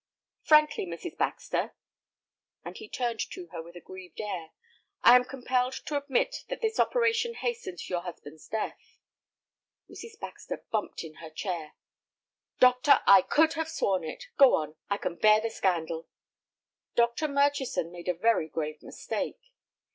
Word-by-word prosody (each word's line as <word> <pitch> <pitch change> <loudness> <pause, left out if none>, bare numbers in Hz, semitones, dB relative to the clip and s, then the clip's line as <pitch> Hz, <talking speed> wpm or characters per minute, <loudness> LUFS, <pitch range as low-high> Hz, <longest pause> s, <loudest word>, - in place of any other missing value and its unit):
"Frankly, 305 -9 +4
Mrs. 170 - -6
Baxter," - - -2 0.9
and - - -7
he 430 - -10
turned 240 -3 -2
to 365 -2 -8
her 165 - -5
with 170 +2 -13
a - - -8
grieved 185 0 -12
air, 185 -7 -4 0.5
"I 240 - +9
am 250 - +6
compelled 255 0 -1
to 300 - -3
admit 280 -3 0
that - - -4
this 445 -2 -1
operation 465 -1 +2
hastened 460 -6 -4
your 175 -1 -2
husband's 160 -3 -10
death." 220 0 -5 0.9
Mrs. 455 -1 -11
Baxter - - -7
bumped 215 -5 -2
in 155 -1 -11
her 160 - -8
chair. 160 -1 -5 0.8
"Doctor, 255 +3 +6
I 195 -1 +9
could 315 - +3
have 320 0 -3
sworn 190 - 0
it. 155 - -6 0.2
Go 275 -2 +8
on, 155 0 -3
I 200 - +1
can 170 - -4
bear 215 0 +6
the 225 +1 -3
scandal." 165 -5 -1 0.9
"Dr. 235 +6 +2
Murchison 280 - +1
made 175 0 -10
a 180 - +1
very 215 -3 +2
grave 155 -1 -4
mistake." - - -5
230 Hz, 150 wpm, -29 LUFS, -, 0.9 s, I